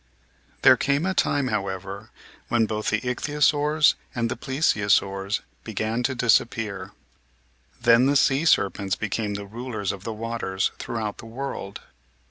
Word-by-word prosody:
There - - +8
came 140 +4 +1
a 190 - 0
time, 145 -6 +1
however, 100 0 -4 0.4
when 115 -1 +2
both 110 0 -2
the 105 +1 0
Ichthyosaurs 150 +3 +2 0.2
and 115 -1 -1
the - - -1
Plesiosaurs 100 -7 +1 0.2
began 110 +2 -2
to 130 +2 -1
dis 120 -2 +5
appear. 100 -5 -6 0.9
Then 120 +2 +5
the 140 - +2
sea 135 +2 +3
serpents 100 - +2
became 105 0 -2
the 100 0 -5
rulers 110 -1 -4
of 100 -1 -8
the 115 - -4
waters 110 -4 -2
throughout 110 -3 -4
the 115 - -9
world. 115 -4 -6
115 Hz, 140 wpm, -24 LUFS, 100-130 Hz, 0.9 s, There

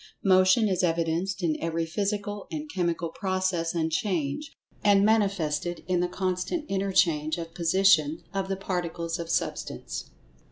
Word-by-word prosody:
Motion 185 +3 +5
is 185 -2 +1
evidenced 170 +2 0
in 160 -3 +2
every 165 0 -1
physical 205 +3 -3
and 305 -1 -5
chemical 170 - -1
process 185 -3 -1
and 160 -1 0
change, 170 - -1 0.3
and 200 -1 +5
manifested 175 -6 +1
in 180 -1 +1
the 180 - +1
constant 185 - -2
interchange 180 -6 +1
of 165 -1 -6
position 170 -3 +3
of 195 -1 -1
the 195 0 -2
Particles 170 -3 -3
of 165 -1 -5
Substance. - - -3
180 Hz, 135 wpm, -27 LUFS, 165-195 Hz, 0.3 s, Motion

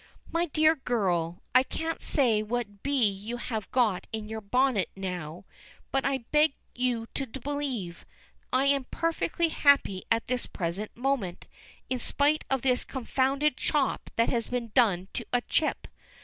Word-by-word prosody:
"My 335 +1 +1
dear 310 +1 +4
girl, 180 -10 -1
I 255 - +8
can't 320 +5 -3
say 235 -7 +2
what 215 -2 -3
bee 275 -5 +3
you 205 +4 -4
have 220 -4 -4
got 225 -8 +1
in 220 -1 -4
your 220 0 -5
bonnet 245 -1 +2
now, 180 -3 -5 0.5
but 270 0 +1
I 265 -3 -1
beg 300 -1 +4 0.2
you 245 -2 0
to 270 - -2
believe, 260 -8 -4 0.5
I 260 +2 +3
am 275 -1 +2
perfectly 330 +2 0
happy 280 - +3
at 230 0 +2
this 250 0 -1
present 185 +5 -4
moment, 245 -9 -1 0.4
in 255 - -1
spite 290 +5 +2
of 270 -2 0
this 255 -2 +2
confounded 270 +2 0
chop 290 -3 0
that 230 - +3
has 235 -2 0
been 240 -3 -3
done 190 -7 +3
to - - -3
a 245 - +2
chip. 310 +5 0
245 Hz, 155 wpm, -28 LUFS, 210-275 Hz, 0.5 s, I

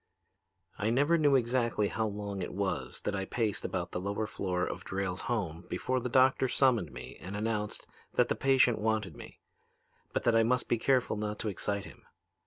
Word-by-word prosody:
"I 105 +2 +1
never 145 +8 +3
knew 145 -4 +4
exactly 120 -4 +1
how 110 +1 -1
long 100 -1 -4
it 90 - -5
was 95 -10 -2
that 105 - -2
I 95 0 -2
paced 110 -1 -1
about - - -3
the - - -2
lower 100 +3 -2
floor 90 -4 -1
of - - -5
Drayle's 95 -1 -3
home 90 -8 -2
before 130 0 0
the 125 - -3
doctor 130 +1 +4
summoned 120 - +2
me 65 0 -9
and 95 +2 -6
announced 105 0 -2 0.3
that - - +4
the - - +1
patient 130 -3 +4
wanted 110 -2 0
me, - - -12 0.7
but - - -1
that 120 - +3
I 115 - +6
must 125 +3 +1
be 120 - +1
careful 130 -3 +2
not 105 0 -3
to 110 - -2
excite 100 +1 -2
him. - - -13
110 Hz, 190 wpm, -31 LUFS, 100-125 Hz, 0.7 s, I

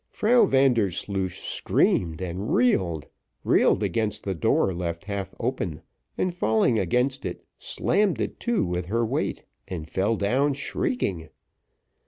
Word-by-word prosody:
Frau 235 +3 +4
Vandersloosh 100 -7 +1
screamed 80 -2 +1
and 95 +4 -4
reeled 90 - +2 0.4
reeled 105 - +3
against 105 +2 -1
the 95 - -2
door 95 +3 +1
left 85 0 -4
half 100 -2 -4
open, 100 - -3 0.3
and 185 -1 0
falling 110 -6 +2
against 125 +8 0
it, - - -6
slammed 205 -4 0
it - - -3
to 235 - 0
with 90 0 -3
her 115 +4 +1
weight, - - -2 0.2
and 80 -4 -5
fell 95 +6 0
down 130 +8 +1
shrieking. 115 - -2
100 Hz, 130 wpm, -25 LUFS, 90-130 Hz, 0.4 s, Frau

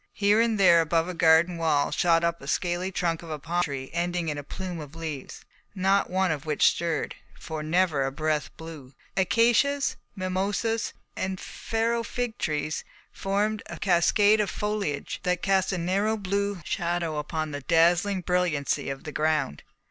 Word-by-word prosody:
Here 205 +2 +4
and 230 -2 +1
there 175 -3 +7
above 165 +1 +1
a 180 - -4
garden 170 +1 +4
wall 155 -3 +1
shot 170 -1 +3
up 170 0 0
the 140 - -11
scaly 175 +3 -1
trunk 170 -3 -1
of 170 - -10
a 155 - -3
palm 170 +4 -1
tree 140 -5 -4
ending 175 -1 -1
in 150 - -3
a - - -7
plume 180 +3 -6
of 150 0 -9
leaves, 155 -5 -6 0.3
not 195 +1 +2
one 185 -1 +1
of 150 -3 -3
which 155 -2 +4
stirred, 165 -4 -2 0.3
for 160 -2 -5
never 155 -2 +2
a 135 - -1
breath 155 +1 -1
blew. 155 -5 -10 0.2
Acacias, 240 +8 +2 0.2
mimosas, 200 +4 -1 0.2
and 190 0 -3
Pharaoh 230 +1 -1
fig 240 +1 -4
trees 155 0 -2 0.3
formed 205 +2 -1
a - - -7
cascade 205 +4 +4
of 205 - -1
foliage 210 -9 -3
that 180 -1 -1
cast 190 -1 +2
a 185 - -1
narrow 195 +6 0
blue 200 -1 -2
shadow 170 -2 -1
upon 155 +1 -3
the 145 0 -5
dazzling 175 +6 +3
brilliancy 170 -6 0
of 135 0 -5
the 150 - -6
ground. 150 - 0
175 Hz, 170 wpm, -26 LUFS, 155-195 Hz, 0.3 s, there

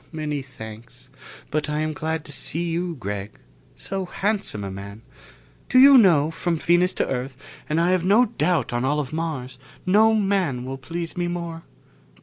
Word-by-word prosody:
"Many 150 -3 -3
thanks. 115 -3 -11 0.4
But 155 0 -1
I 150 +1 -1
am 155 0 -1
glad 160 +1 -3
to 150 - -9
see 165 +4 -2
you, 170 0 -2
Gregg. 100 -4 -5 0.4
So 195 -1 -4
handsome 195 - -2
a 100 - -4
man. 100 +3 -9 0.7
Do - - +3
you 275 +2 +9
know, 165 - +5
from 170 +1 -1
Venus 175 +3 +3
to - - 0
Earth, 130 0 -3 0.3
and 155 +2 +1
I 170 +2 +3
have 185 -2 +2
no 210 +7 +5
doubt 175 - 0
on 120 +1 0
all 145 +3 +1
of 145 -1 -4
Mars, 140 -6 -4 0.3
no 215 +4 +5
man 190 -12 0
will 135 +1 -5
please 165 +4 -5
me 175 -1 -1
more." 170 -1 -4
160 Hz, 175 wpm, -23 LUFS, 130-180 Hz, 0.7 s, you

